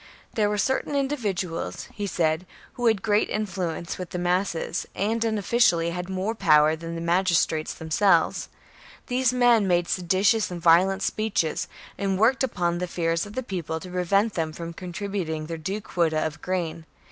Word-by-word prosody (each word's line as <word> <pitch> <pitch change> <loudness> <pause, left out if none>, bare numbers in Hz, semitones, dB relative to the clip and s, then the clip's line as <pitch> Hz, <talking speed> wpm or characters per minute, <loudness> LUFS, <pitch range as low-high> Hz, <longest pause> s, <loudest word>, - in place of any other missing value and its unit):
There 210 -2 +2
were 210 - -1
certam 265 +7 0
mdividuals, 195 - -3
he 205 -2 -3
said, 165 -1 0 0.3
who 245 -1 0
had 220 -4 +2
great 210 -1 +2
influence 185 -6 -3
with 180 -2 -5
the - - -4
masses, 175 -1 -1
and 225 +4 0
unofficially 210 -6 +2
had 180 +1 -5
more 190 +3 -1
power 155 -7 +4
than 165 +1 -7
the 165 - -4
magis 175 +1 +3
trates 155 -1 -4
themselves. 165 +2 +2 0.6
These 250 -1 +1
men 240 -4 +4
made 175 -1 +2
seditious 190 +5 +2
and 180 -1 -5
violent 180 +4 +4
speeches, 210 -7 -1 0.3
and 195 -1 0
worked 240 +7 +3
upon 175 -8 0
the 180 - -2
fears 165 +1 -1
of 205 - -11
the 260 - -3
people 170 -6 -4
to 180 +2 -10
prevent 195 +4 +1
them 160 -2 -2
from 170 +1 -6
contributing 180 -3 -4
their 165 +1 -5
due 190 +6 -4
quota 160 -5 0
of 155 0 -5
grain. 165 -3 -3
180 Hz, 170 wpm, -25 LUFS, 165-205 Hz, 0.6 s, power